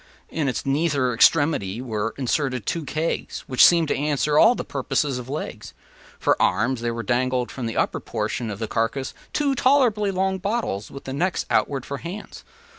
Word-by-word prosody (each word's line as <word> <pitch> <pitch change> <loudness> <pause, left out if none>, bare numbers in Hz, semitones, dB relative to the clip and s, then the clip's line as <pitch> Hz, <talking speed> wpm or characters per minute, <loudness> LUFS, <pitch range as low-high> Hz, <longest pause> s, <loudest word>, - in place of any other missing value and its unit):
In 155 -3 -1
its 125 - -3
nether 140 -3 +1
extremity 120 -6 +3
were 115 -3 -3
inserted 130 -3 -1
two 165 -3 -2
kegs, 155 +5 -2
which 130 -2 +4
seemed 170 -2 +6
to - - +1
answer 150 0 0
all 235 +2 +6
the - - -5
purposes 135 0 -1
of 125 +1 -9
legs. 115 -7 -6 0.4
For - - +1
arms 115 +6 +1
there 115 -1 -2
dangled 125 0 0
from 125 -3 -4
the 115 - -4
upper - - 0
portion 115 - -3
of 100 - -5
the 110 +1 -3
carcass 115 +5 -1 0.2
two 285 -2 +1
tolerably 250 -6 +3
long 190 0 0
bottles, 200 - -2
with 140 - -10
the 130 - -6
necks 180 +7 -1
outward 135 -3 +1
for 140 - -4
hands. 195 +5 -8
135 Hz, 180 wpm, -23 LUFS, 120-170 Hz, 0.4 s, seemed